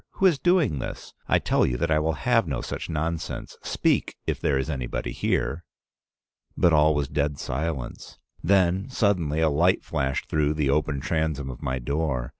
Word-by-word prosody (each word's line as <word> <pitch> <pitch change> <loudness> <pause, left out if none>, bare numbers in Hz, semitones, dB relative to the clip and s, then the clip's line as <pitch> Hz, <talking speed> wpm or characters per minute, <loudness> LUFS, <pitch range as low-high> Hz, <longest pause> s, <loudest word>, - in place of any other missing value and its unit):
Who 195 - 0
is 170 -7 +4
doing 175 - +2
this? - - -7
I - - +4
tell - - +1
you 60 - +1
I 80 0 +2
will 80 +1 0
have 115 -6 +3
no 70 -4 -2
such - - -5
nonsense. 80 0 -3
Speak, - - 0
if - - -1
there 70 - +2
is 65 +1 -1
anybody 65 -5 -3
here.' 85 - -1 0.9
But 85 - +4
all 75 0 +5
was 75 -2 0
dead 75 0 -1
silence. 70 -1 -4 0.3
Then 95 +4 +2
suddenly 90 - +1
a 80 - +4
light 85 +6 +3
flashed 65 -4 -2
through 75 0 +1
the 75 -3 +1
open 75 -1 0
transom 80 -3 -1
of - - -11
my 65 0 -1
door. 65 -1 -2
75 Hz, 175 wpm, -25 LUFS, 70-85 Hz, 0.9 s, all